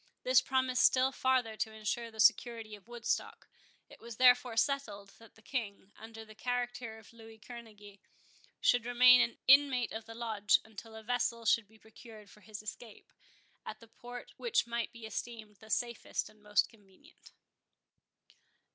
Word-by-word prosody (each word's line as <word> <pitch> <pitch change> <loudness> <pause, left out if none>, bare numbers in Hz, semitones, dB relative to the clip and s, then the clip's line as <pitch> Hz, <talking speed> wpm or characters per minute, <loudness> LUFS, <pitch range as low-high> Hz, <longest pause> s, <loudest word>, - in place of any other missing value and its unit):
This - - +5
promised 260 -1 0
still 260 +1 +4
farther 260 -4 0
to 220 - -2
insure 220 +2 -3
the 220 -1 -15
security 225 -1 +2
of 205 0 -12
Woodstock. 240 -1 -3 0.4
It - - -16
was 235 -1 -10
therefore 250 -2 +4
settled, 220 -7 -1
that 225 -1 -18
the 225 - -21
King, 205 -7 -5
under 225 0 -11
the 215 - -14
character 245 0 -4
of 220 +1 -17
Louis 225 -1 -14
Kerneguy, 215 -3 -12 0.6
should 245 -1 +3
remain 250 0 +7
an 235 - 0
inmate 270 -3 +5
of 220 0 -6
the 225 - -10
Lodge, 220 -3 +2
until 220 +1 -12
a 220 - -10
vessel 235 0 -1
should 220 -1 +3
be 220 +1 -21
procured 220 -1 -15
for 210 - -18
his 215 0 -9
escape, 215 +1 -10 0.5
at 215 - -8
the 230 - -16
port 245 +1 -10
which 475 0 +1
might 235 -1 -3
be 230 -1 -11
esteemed 220 -1 -7
the 220 +1 -16
safest 235 +1 -2
and 215 0 -22
most 210 -1 +2
convenient. 220 - -21
230 Hz, 165 wpm, -32 LUFS, 215-245 Hz, 0.6 s, remain